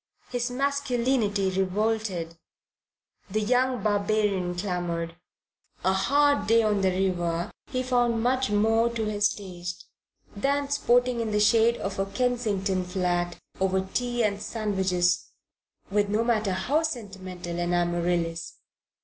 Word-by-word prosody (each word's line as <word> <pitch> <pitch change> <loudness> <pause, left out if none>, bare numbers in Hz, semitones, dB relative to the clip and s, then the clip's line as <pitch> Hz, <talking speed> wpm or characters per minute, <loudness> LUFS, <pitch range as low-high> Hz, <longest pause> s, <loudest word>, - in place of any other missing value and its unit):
His 245 0 -1
masculinity 250 -6 0
revolted. 190 -2 -1 0.9
The 215 +3 0
young 250 +1 +1
barbarian 205 -3 +1
clamoured. 175 -3 -3 0.7
A 190 - +4
hard 285 +8 +3
day 230 +1 +5
on 210 -2 +1
the 190 - +3
river 180 -1 -1 0.2
he 255 -1 -2
found 240 -3 +1
much 260 +1 +1
more 225 +3 +3
to 230 -2 -2
his 210 0 +2
taste 180 -4 -7 0.5
than 280 +6 0
sporting 245 -3 +2
in 225 - -2
the 210 0 +1
shade 225 +3 +4
of 195 0 -4
a 195 - 0
Kensington 200 -5 0
flat 180 -1 -1 0.2
over 190 0 +2
tea 240 -1 0
and 205 -1 0
sandwiches 190 -6 0 0.6
with 205 0 +2
no 215 +2 +1
matter 220 -4 +1
how 255 - +1
sentimental 190 - -5
an 175 0 -1
Amaryllis. 175 -1 0
205 Hz, 125 wpm, -26 LUFS, 185-235 Hz, 0.9 s, day